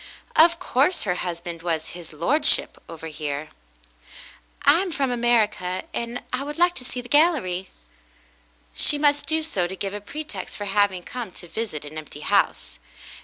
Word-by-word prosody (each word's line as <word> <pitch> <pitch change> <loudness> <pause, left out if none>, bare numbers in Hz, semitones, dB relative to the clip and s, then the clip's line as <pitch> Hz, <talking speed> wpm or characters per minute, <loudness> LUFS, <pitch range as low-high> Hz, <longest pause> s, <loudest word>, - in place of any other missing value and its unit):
Of 335 +1 +7
course 325 0 +1
her 180 - +1
husband 170 -1 -5
was 165 -2 -2
"his 175 -2 -10
lordship," 175 - +2
over 160 -1 -8
here. 150 -1 -4 1.1
"I 335 - +6
am 380 -2 -2
from 275 -4 0
America, 220 -6 +1
and 235 +1 -4
I 250 - 0
would 295 +2 -6
like 350 +1 +4
to 255 - -7
see 250 0 -5
the 245 - -12
gallery." 245 - +2 1.0
She 290 - +5
must 290 0 +2
do 320 0 +1
so 190 - -1
to 190 - -6
give 195 +1 -4
a 205 - -5
pretext 300 +9 -7
for 205 - -4
having 195 -2 +2
come 245 0 -6
to 175 - -9
visit 170 -7 -5
an 155 +2 -6
empty 155 - -10
house. - - 0
210 Hz, 170 wpm, -24 LUFS, 175-290 Hz, 1.1 s, Of